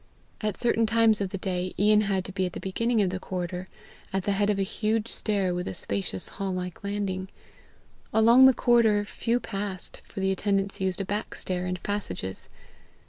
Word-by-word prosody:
At 210 -3 -2
certain 230 -2 +3
times 225 -1 +4
of 195 - -1
the 195 - -4
day, 185 -1 -3
Ian 210 +1 +5
had 195 -3 0
to - - -5
be 190 -1 0
at 180 - -8
the - - -5
beginning 225 +3 +1
of 185 - 0
the 185 - -3
corridor, 180 0 -4 0.4
at 190 -1 -1
the 200 - 0
head 205 +1 +2
of 205 - +2
a 195 - +1
huge 215 +3 -1
stair 200 -4 0
with 180 0 -3
a 95 - -4
spacious 100 -1 -3
hall 195 -1 -4
like 180 0 -5
landing. 200 -2 -2 0.8
Along 235 +4 +7
the 265 - +6
corridor 220 -4 +4
few 235 +3 -1
passed, 195 -5 -5
for - - -9
the 190 0 +1
attendants 195 0 0
used 190 +1 0
a - - -3
back 205 +3 -3
stair 180 -1 -2
and 180 0 -4
passages. 95 - -3
195 Hz, 195 wpm, -27 LUFS, 185-215 Hz, 0.8 s, Along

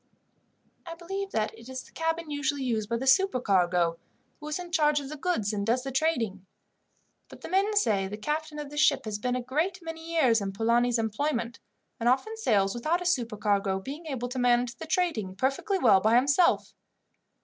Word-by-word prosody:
"I 335 -2 -8
believe 390 +4 -5
that 220 - -2
it 230 +2 -13
is 260 0 -6
the - - -19
cabin 325 -1 -2
usually 285 -1 -1
used 220 -4 -1
by 235 - 0
the 260 - -4
supercargo, 190 - +2 0.4
who 300 - -9
is 300 - -2
in 355 -1 -8
charge 300 -2 +3
of 275 -1 -7
the 305 - -6
goods 275 - -1
and 200 -1 -2
does 240 +4 +1
the 270 - -4
trading, 245 - 0 0.9
but - - -13
the - - -8
men 395 +4 +1
say 205 - +2
the 205 +2 -6
captain 300 +6 -3
of 295 -1 -6
this 295 - -3
ship 305 - +3
has 210 -1 -3
been 250 +3 -1
a 250 - -3
great 315 +9 -1
many 325 0 -7
years 250 -9 +3
in 195 -1 -3
Polani's 235 +3 +2
employment, 235 +2 -2 0.4
and 235 +1 +2
often 275 - +1
sails 200 - +1
without 315 +9 -1
a - - -10
supercargo, 210 - 0
being 290 - -8
able 255 -4 -3
to 255 +1 -4
manage 245 0 +2
the 320 - -8
trading 310 - -1
perfectly 275 - 0
well 225 - +5
by 220 +3 +3
himself. 280 +8 +3
260 Hz, 195 wpm, -28 LUFS, 225-320 Hz, 0.9 s, well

